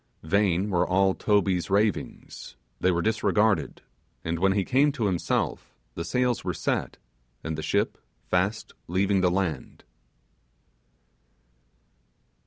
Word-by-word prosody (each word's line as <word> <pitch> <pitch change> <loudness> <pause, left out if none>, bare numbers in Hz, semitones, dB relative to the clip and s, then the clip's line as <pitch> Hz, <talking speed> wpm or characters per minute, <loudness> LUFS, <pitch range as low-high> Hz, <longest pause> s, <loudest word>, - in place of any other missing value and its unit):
Vain 100 +2 +1
were 90 -2 +2
all 95 +1 +3
Toby's 100 -4 +1
ravings 100 - -2 0.2
they 95 - +2
were 85 -2 +1
disregarded; 110 -1 +1 0.4
and 85 0 -2
when 95 +1 +3
he 100 -2 0
came 140 +3 +3
to 120 -7 -2
himself, 90 -4 -1 0.2
the 85 - -4
sails 125 +7 0
were 90 -3 -2
set, - - -2 0.5
and 80 -1 -3
the 80 - -4
ship - - 0 0.2
fast 95 - -1
leaving 95 +2 +1
the 90 - +3
land. 90 -6 -3
95 Hz, 120 wpm, -26 LUFS, 90-105 Hz, 0.5 s, all